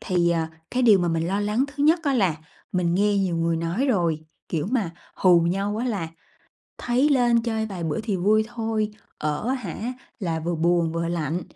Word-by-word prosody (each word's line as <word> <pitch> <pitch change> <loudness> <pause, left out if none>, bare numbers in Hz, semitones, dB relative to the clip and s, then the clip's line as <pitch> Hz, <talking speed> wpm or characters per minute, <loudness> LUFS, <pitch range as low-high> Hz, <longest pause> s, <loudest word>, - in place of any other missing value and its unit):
thì, 175 -2 +1
à, 165 -1 0 0.2
cái 255 0 0
điều 215 -5 +7
mà 175 - 0
mình 165 0 0
lo 195 +2 0
lắng 210 +6 +1
thứ 285 0 -4
nhất 325 +3 +4
á 280 -3 +1
là 190 -9 +2 0.4
mình 175 -2 +1
nghe 205 +1 +2
nhiều 185 -3 0
người 165 0 +1
nói 170 +11 -1
rồi, 170 - +1 0.3
kiểu, 160 -3 -1
mà 225 -9 0 0.2
hù 180 -2 +5
nhau 195 +5 0
á 230 - -2
là 200 -9 -2 0.7
thấy 250 +4 +2
lên 240 -4 +3
chơi 220 -2 -1
vài 190 -5 -5
bữa 155 -2 -1
thì 210 -3 -2
vui 215 +4 +3
thôi, 225 -2 -2 0.3
ở 150 +9 -2
á 260 - +2
hả, 235 0 -4 0.3
là 165 -6 -2
vừa 170 +2 -2
buồn 170 0 +2
vừa 165 0 -2
lạnh, 170 0 -2
195 Hz, 210 wpm, -24 LUFS, 170-230 Hz, 0.7 s, điều